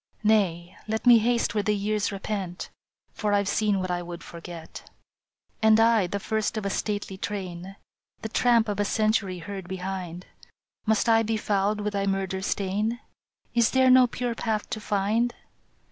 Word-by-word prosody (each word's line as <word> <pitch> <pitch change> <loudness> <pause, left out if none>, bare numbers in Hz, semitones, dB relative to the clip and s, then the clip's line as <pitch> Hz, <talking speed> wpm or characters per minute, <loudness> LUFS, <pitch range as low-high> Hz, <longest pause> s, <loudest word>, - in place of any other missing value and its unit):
" - - -36
Nay, 185 -5 +1
let 220 +2 -2
me 240 -2 +8
haste 235 +1 +1
where 210 - +1
the 210 +1 +1
years 210 +1 -1
repent, 195 -3 -4 0.4
For 210 -1 -1
I 200 - +4
ve - - -8
seen 205 0 +1
what 185 -1 -2
I 175 0 -1
would 175 0 -8
forget." 170 -1 -10 0.4
" - - -44
And 220 0 +5
I, 225 -4 +4
the 200 +3 -3
first 220 +2 -1
of 215 - -3
a 200 - -1
stately 205 -2 -3
train, 190 -2 -5 0.5
The 220 - -3
tramp 235 0 +3
of 205 -1 -2
a - - +3
century 215 -3 +1
heard 190 +1 -7
behind, 185 -2 -5 0.6
Must 220 +1 +2
I 225 -1 +5
be 225 0 -1
fouled 210 0 0
with 210 0 -2
thy 200 0 -1
murder 190 -1 -1
stain? 205 +4 -1 0.5
Is 235 -1 +4
there 260 -1 +4
no 255 0 +7
pure 245 0 -3
path 220 -2 -2
to 225 - -2
find? 210 +4 0
205 Hz, 180 wpm, -26 LUFS, 190-220 Hz, 0.6 s, me